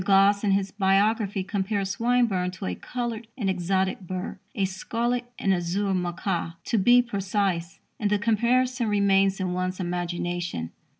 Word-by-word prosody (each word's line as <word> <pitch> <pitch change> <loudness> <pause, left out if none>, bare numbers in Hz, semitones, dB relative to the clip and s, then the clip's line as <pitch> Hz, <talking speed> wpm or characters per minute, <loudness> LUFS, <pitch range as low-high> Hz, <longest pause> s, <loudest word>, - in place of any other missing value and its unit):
Gosse 200 +2 +4
in 205 - +2
his 195 0 +1
biography 200 0 +2
compared 200 0 -1
Swinburne 220 -3 +1
to 185 - -6
a 90 - -1
coloured 235 - -4
and 200 -6 0
exotic 190 +1 0
bird 185 0 -5 0.2
a 200 -4 +1
"scarlet 240 +6 -2
and 195 - +2
azure 190 +3 0
macaw," 175 -1 -2
to, 230 - 0
be 245 +5 +6
precise 195 -4 -1 0.2
and 210 - +1
the 210 - +3
comparison 240 +3 +2
remains 195 -1 +3
in 185 -1 -1
one's 185 +1 -2
imagination. 175 - -3
195 Hz, 145 wpm, -26 LUFS, 185-215 Hz, 0.2 s, be